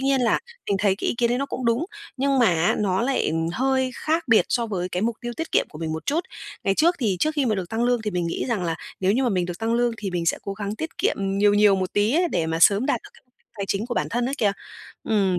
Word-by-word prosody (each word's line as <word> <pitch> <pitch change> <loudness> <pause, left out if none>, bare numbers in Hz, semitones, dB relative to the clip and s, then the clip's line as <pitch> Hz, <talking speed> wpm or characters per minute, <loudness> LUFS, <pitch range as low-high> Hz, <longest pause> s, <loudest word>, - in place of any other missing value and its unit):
nhiên 270 -1 +2
là, 235 - +3 0.3
mình 200 - +2
thấy 200 -1 +2
cái - - -2
ý - - 0
kiến 235 -1 +3
đấy 245 - +1
nó 275 - -1
cũng 255 - -5
đúng, 235 +7 +2 0.3
nhưng 275 0 +1
mà 240 - +5
á 165 0 +2
nó 195 0 +1
lại, 265 +1 +1
ừm, 165 +1 -1
hơi 260 +3 +1
khác 320 +2 -1
biệt 225 - +5
so 235 -1 0
với 185 -4 -3
cái 180 +2 -2
mục 230 0 0
tiêu 240 0 -4
tiết 325 - -5
kiệm - - +3
của 150 - -11
mình 160 -1 -3
một 160 -1 -6
chút. 310 +4 +1 0.4
Ngày 195 - +2
trước 340 - +3
thì 210 -8 0
trước 310 - +3
khi 280 -4 +1
mà 220 - +2
được 185 -3 -4
tăng 225 +3 -1
lương 245 -2 +1
thì 210 - -2
mình 175 -2 -1
nghĩ 170 - -2
rằng 215 -7 -1
là 165 -1 -1 0.3
nếu 190 +1 +3
như 255 +5 +1
mà 250 - +2
mình 185 -4 0
được 175 0 -6
tăng 225 +1 0
lương 240 0 +2
thì 205 -3 -4
mình 175 -1 -2
sẽ - - +2
cố 200 - -4
gắng 205 +1 -4
tiết 320 +5 -6
kiệm - - +1
nhiều 200 +1 +2
nhiều 205 -1 +5
một 185 -1 -2
tí 205 +5 +2
ấy, 350 +2 +3
để 170 - -1
mà 165 0 -1
sớm 205 +7 +5
đạt - - +1
được - - -14
cái - - -20
mục 250 - -42
đích - - -38
tài 200 - -1
chính 200 +3 -1
của 245 - -3
bản - - -1
thân 240 +1 0
ấy 275 - -2
kìa. 205 -3 +2 0.6
Ừm, 195 -5 +2
215 Hz, 310 wpm, -24 LUFS, 190-245 Hz, 0.6 s, mà